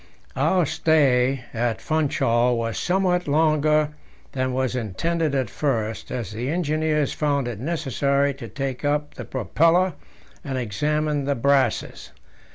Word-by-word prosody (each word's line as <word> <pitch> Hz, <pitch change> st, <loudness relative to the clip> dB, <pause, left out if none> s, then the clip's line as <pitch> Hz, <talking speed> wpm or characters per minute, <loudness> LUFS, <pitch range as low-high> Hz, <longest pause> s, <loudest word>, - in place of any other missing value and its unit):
Our 180 Hz, -3 st, +2 dB
stay 135 Hz, -5 st, +2 dB
at 115 Hz, -1 st, -1 dB
Funchal 135 Hz, -6 st, +1 dB
was 115 Hz, -1 st, -2 dB
somewhat 180 Hz, -1 st, +1 dB
longer 155 Hz, 0 st, +3 dB, 0.4 s
than 130 Hz, -1 st, -1 dB
was 130 Hz, 0 st, -1 dB
intended 150 Hz, -, -1 dB
at 130 Hz, -3 st, 0 dB
first, 115 Hz, -7 st, -2 dB
as 120 Hz, -6 st, -4 dB
the 120 Hz, +5 st, -4 dB
engineers 155 Hz, -3 st, 0 dB
found 140 Hz, -4 st, 0 dB
it 115 Hz, -4 st, -5 dB
necessary 140 Hz, -1 st, 0 dB
to 135 Hz, -, -9 dB
take 135 Hz, -3 st, -4 dB
up 145 Hz, 0 st, 0 dB
the -, -, -8 dB
propeller 165 Hz, -, +2 dB, 0.5 s
and 135 Hz, -2 st, -3 dB
examine 150 Hz, +5 st, -1 dB
the 140 Hz, 0 st, 0 dB
brasses. 140 Hz, +2 st, 0 dB
140 Hz, 130 wpm, -23 LUFS, 125-155 Hz, 0.5 s, longer